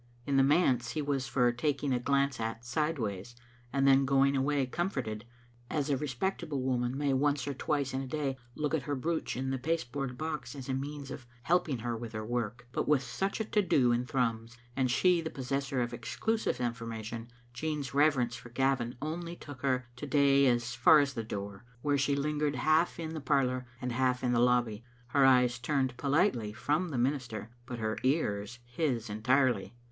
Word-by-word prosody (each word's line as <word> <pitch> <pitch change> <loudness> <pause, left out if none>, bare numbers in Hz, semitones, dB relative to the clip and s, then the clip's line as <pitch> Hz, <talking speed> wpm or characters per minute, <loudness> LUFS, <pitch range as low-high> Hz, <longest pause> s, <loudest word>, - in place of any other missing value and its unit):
In 140 - 0
the 135 - +6
manse 135 -4 +3
he 155 - -1
was 140 -2 -1
for 125 -2 +3
tak 140 +4 0
i^g 140 -2 0
a - - 0
glance 140 0 +1
at 115 +1 -4
sideways 120 - -2 0.4
and 135 0 +2
then 135 0 +6
going 140 +1 +3
away 140 0 +1
com 175 +8 -1
forted, 110 - -4 0.4
as 150 -1 -1
a - - +3
respectable 145 +2 -2
woman 125 0 0
may 145 -1 +1
once 140 0 +1
or 140 - -1
twice 140 0 -1
in 135 - -1
a 135 - -5
day 140 -1 -2 0.2
look 150 0 -2
at 160 - +2
her 145 +1 -2
brooch 160 +3 -2
in 130 +1 -2
the 135 - -2
pasteboard 135 -3 -2
box 155 -1 -4
as 135 -3 -7
a 135 - -1
means 140 +1 -4
of 130 -2 -8 0.2
helping 170 -5 +2
her 120 +1 -3
with 115 0 -7
her 110 0 -4
work. 120 0 -3
But - - -2
with 145 -3 +3
such 195 - -2
a 220 - -1
to 210 0 +2
do 135 -9 +3
in 120 +1 0
Thrums, 115 -2 -1 0.2
and 130 -1 +1
she 175 +7 +3
the 160 - -4
possessor 135 -1 -2
of 120 0 -4
exclusive 215 - -1
informa 115 -2 -3
tion, 115 +1 -6 0.3
Jean's 150 -1 -3
reverence 140 -5 +3
for 120 0 -10
Gavin 125 -1 0
only 170 +2 -4
took 145 -6 -10
her 130 -2 +1
to 145 - -6
day 140 -1 +4
as 120 0 +1
far 125 +5 +7
as 140 -1 +1
the 115 - -3
door, 100 -1 -6 0.2
where 145 -1 +2
she 140 +1 +2
lingered 150 +1 0
half 155 +7 +2
in 160 -1 -4
the 155 - -5
par 140 -1 +3
lour 125 0 -3
and 125 -1 -3
half 125 +1 +1
in 125 - +2
the 120 - +3
lobby, 120 -3 +2 0.3
her 135 +1 +5
eyes 125 -2 +4
turned 130 0 0
politely 140 - +1
from 150 +10 0
the 140 - -3
minister, 120 -4 -1 0.2
but 125 -2 -5
her 110 -1 -2
ears 120 -5 0
his 120 -2 -1
entirely. 120 +4 +1
135 Hz, 205 wpm, -31 LUFS, 120-145 Hz, 0.4 s, far